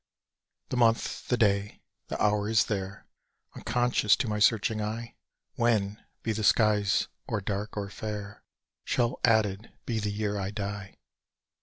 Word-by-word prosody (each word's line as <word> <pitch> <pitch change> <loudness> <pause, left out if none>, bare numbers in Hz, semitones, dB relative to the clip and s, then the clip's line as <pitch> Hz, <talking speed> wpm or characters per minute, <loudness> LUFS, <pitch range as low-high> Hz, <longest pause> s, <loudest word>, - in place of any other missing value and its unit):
The 125 - -2
month, 115 -1 +2
the 125 - +2
day, 100 -2 +1 0.3
the - - -4
hour 105 0 +2
is 110 0 +4
there, 100 -2 -4 0.5
Unconscious 120 -4 +2
to 130 - -2
my 105 -1 -1
searching 110 +1 +3
eye 115 +2 -4 0.4
When, 105 -3 +1 0.2
be 115 - 0
the 110 0 -3
skies 105 -1 +3 0.2
or 105 - -1
dark 100 +2 -4
or 100 -1 -3
fair, 105 -1 -6 0.4
Shall 120 0 0
added 110 -3 +2
be 115 -2 -1
the 105 0 -1
Year 105 0 -2
I 95 -1 -2
die! 100 -1 -5
105 Hz, 145 wpm, -28 LUFS, 100-115 Hz, 0.5 s, is